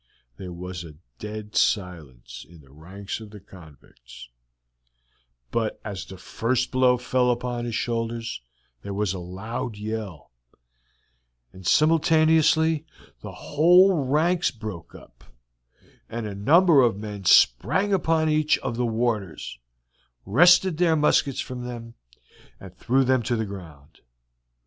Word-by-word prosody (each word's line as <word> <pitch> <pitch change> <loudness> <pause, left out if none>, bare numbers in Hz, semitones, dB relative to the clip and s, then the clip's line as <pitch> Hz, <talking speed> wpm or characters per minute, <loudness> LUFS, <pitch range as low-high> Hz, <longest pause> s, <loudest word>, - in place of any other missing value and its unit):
There 90 -2 -8
was 90 0 -7
a 80 -3 -12 0.2
dead 105 0 -8
silence 85 - -2
in 85 -2 -16
the 70 -2 -21
ranks 95 +8 -8
of 110 -1 -11
the 105 0 -12
convicts, 70 -9 -16 1.2
but 115 -2 -2
as 100 -3 -6
the 95 - -11
first 120 +7 -2
blow 130 -1 +3
fell 125 0 0
upon 120 0 -2
his 120 -2 -4
shoulders 115 - -3 0.4
there 100 +6 -6
was 100 -2 -1
a 95 - -6
loud 105 +5 -6
yell, 105 - -6 1.2
and 95 -1 -9
simultaneously 160 0 +3 0.4
the - - -9
whole 175 +2 +3
ranks 165 +6 +1
broke 110 -8 -9
up, - - -17 0.9
and 115 -1 -5
a 105 - -5
number 150 - +4
of 115 -5 +2
men 105 -2 -8
sprang 145 - +3
upon 160 -4 +1
each 155 0 +2
of 120 -3 -5
the 125 -1 0
warders, 110 - -3 0.7
wrested 175 - +4
their 170 -3 +3
muskets 150 -3 +1
from 125 -1 -7
them, 120 -1 -8 0.7
and 95 -2 -13
threw 135 +3 +1
them 130 -1 +2
to 120 +2 -2
the 110 -1 -2
ground. 80 -8 -12
115 Hz, 130 wpm, -24 LUFS, 95-140 Hz, 1.2 s, number